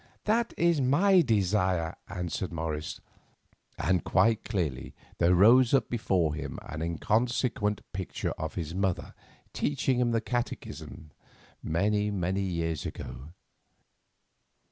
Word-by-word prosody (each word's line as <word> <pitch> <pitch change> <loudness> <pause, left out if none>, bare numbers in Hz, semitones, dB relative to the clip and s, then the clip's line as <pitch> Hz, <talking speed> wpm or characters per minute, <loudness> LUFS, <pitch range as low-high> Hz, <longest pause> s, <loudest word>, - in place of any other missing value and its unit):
"That 225 +2 +1
is 170 -3 +3
my 180 +9 +5
desire," 95 - +1
answered 90 0 -3
Morris; 80 -2 -4 0.8
and 90 -2 +1
quite 110 +4 +3
clearly 80 - -3 0.2
there 85 +1 +4
rose 120 +7 +6
up 135 - +1
before 95 -9 +1
him 80 - -5
an 80 +1 -6
inconsequent 105 - 0
picture 95 -1 -3
of 80 0 -5
his 80 -3 -4
mother 95 -1 -1 0.4
teaching 135 -3 0
him 125 -1 +2
the 115 -1 +2
Catechism 115 -9 -5 0.5
many, 105 +5 +1
many 95 -1 -1
years 85 -5 -2
ago. 75 +6 -7
95 Hz, 115 wpm, -29 LUFS, 85-120 Hz, 0.8 s, rose